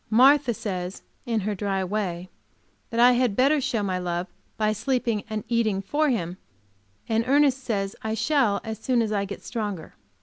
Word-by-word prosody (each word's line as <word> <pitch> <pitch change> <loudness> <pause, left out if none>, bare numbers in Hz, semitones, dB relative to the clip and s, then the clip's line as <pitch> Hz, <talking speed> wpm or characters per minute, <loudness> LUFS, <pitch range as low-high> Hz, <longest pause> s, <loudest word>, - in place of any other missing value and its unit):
Martha 265 +3 +5
says, 185 -4 -4 0.2
in 225 -2 0
her 210 +2 -1
dry 195 -1 -1
way, 185 -2 -3 0.6
that 230 - -2
I 245 +1 +8
had 245 -4 +2
better 280 +5 +3
show 225 -4 -1
my 185 -2 -1
love 175 0 -2 0.3
by 215 -1 +1
sleeping 230 -1 -1
and 215 -1 -3
eating 225 -4 +1
for 290 +10 0
him, 180 -8 -2 0.7
and 225 0 +1
Ernest 275 -1 +3
says 200 -4 -2
I 220 0 -2
shall, 225 -3 +2
as 220 0 -5
soon 245 -3 +1
as 215 - -2
I 200 -1 0
get 200 +1 -8
stronger. 205 -8 -4
220 Hz, 175 wpm, -25 LUFS, 195-245 Hz, 0.7 s, I